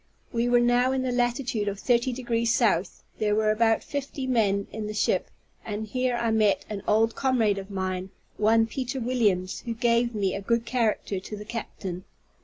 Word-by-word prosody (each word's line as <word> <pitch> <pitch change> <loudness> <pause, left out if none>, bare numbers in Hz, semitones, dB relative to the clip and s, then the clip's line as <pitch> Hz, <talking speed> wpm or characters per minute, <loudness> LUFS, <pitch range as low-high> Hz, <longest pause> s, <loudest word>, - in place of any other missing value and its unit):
We 235 +1 +1
were 245 0 +5
now 245 +1 +3
in 260 -1 0
the 255 - -1
latitude 245 -3 0
of 200 -1 -2
30 245 +2 +2
degrees 235 -2 0
south; 200 -8 +1 0.2
there 210 -1 +2
were 215 0 +3
about 225 +1 +2
fifty 280 -1 -4
men 205 -6 +1
in 215 -1 -5
the 210 - -5
ship; - - +1 0.3
and 215 0 -4
here 250 +3 -1
I 235 -1 0
met 215 -2 +2
an 200 -2 -4
old 225 +1 +3
comrade 230 -7 +2
of 195 0 -9
mine, 190 -1 -3 0.3
one 225 +1 +4
Peter 255 +3 -4
Williams, 210 -7 0
who 230 - -2
gave 235 0 +2
me 195 -3 0
a 200 - -3
good 230 +3 0
character 225 -5 0
to 210 +3 -8
the 210 - -8
captain. 195 -5 -6
225 Hz, 190 wpm, -26 LUFS, 210-245 Hz, 0.3 s, were